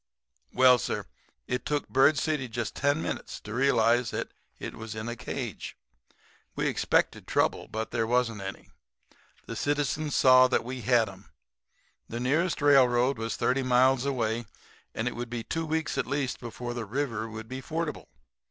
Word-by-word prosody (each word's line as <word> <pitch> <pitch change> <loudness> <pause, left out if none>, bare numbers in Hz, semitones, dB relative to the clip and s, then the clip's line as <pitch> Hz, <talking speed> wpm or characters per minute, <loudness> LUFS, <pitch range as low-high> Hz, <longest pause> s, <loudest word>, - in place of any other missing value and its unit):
"Well, 125 -1 +6
sir, - - -3 0.4
it 125 -1 -2
took 145 0 -1
Bird 140 +3 +4
City 150 -2 -1
just 120 0 -4
ten 145 +3 +1
minutes - - -4
to 105 - -8
realize 120 -2 +3
that - - -3 0.3
it - - -6
was 110 0 -7
in 110 +1 -5
a 120 - -3
cage. - - -6 0.8
We - - -1
expected - - +1
trouble; - - +1
but 110 +1 -4
there 110 - 0
wasn't 115 -3 +1
any. 95 0 -8 0.7
The - - -6
citizens 145 +1 -1
saw 130 0 +7
that 130 - +1
we 125 +1 -6
had 120 0 +3
'em. 95 0 -12 0.8
The 115 - -4
nearest 150 +5 0
railroad 130 -3 +4
was 115 0 -2
thirty 130 +2 +1
miles 130 0 +3
away; 120 -4 -1 0.5
and - - -1
it - - -2
would 120 +1 -5
be 120 -1 -4
two 165 +5 -3
weeks 160 0 -1
at - - -1
least 140 -1 -2
before 120 0 -6
the 120 -2 -4
river 115 -1 -2
would 110 0 -8
be 130 +3 -6
fordable. 160 +2 -4
125 Hz, 170 wpm, -28 LUFS, 115-140 Hz, 0.8 s, saw